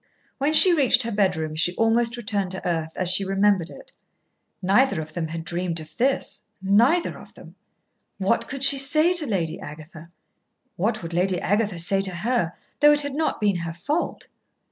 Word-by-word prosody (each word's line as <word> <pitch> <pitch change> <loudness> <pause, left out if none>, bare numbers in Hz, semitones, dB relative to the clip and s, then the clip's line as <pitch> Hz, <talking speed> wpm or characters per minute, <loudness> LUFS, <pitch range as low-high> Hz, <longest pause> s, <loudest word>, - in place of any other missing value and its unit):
When 285 +3 +1
she 350 +3 +9
reached 260 -5 +3
her 230 - -4
bedroom 180 -7 -1
she 175 +3 0
almost 230 +1 +1
returned 205 -5 -2
to 190 - -6
earth 160 -2 -2
as 185 - -2
she 185 +2 +2
remembered 195 -2 +1
it. - - -14 0.7
Neither 200 +3 +2
of 155 0 -8
them 165 -1 -3
had 165 +1 -6
dreamed 170 0 -3
of 155 0 -13
this 265 +3 -1 0.2
neither 230 - +2
of - - -16
them. - - -14 0.6
What 195 +4 0
could 275 0 -6
she 275 0 +4
say 310 +6 +2
to 335 -5 +1
Lady 175 -5 -2
Agatha? 155 -1 -11 0.7
What 215 +2 -2
would 165 0 -7
Lady 180 +1 0
Agatha 205 -1 -1
say 195 +4 +1
to 190 -2 -3
her, 200 -2 -1 0.3
though 295 0 +6
it 295 - +2
had 285 -1 -5
not 315 +3 -2
been 205 -4 +1
her 170 -1 -5
fault? 290 - -3
195 Hz, 185 wpm, -23 LUFS, 170-250 Hz, 0.7 s, she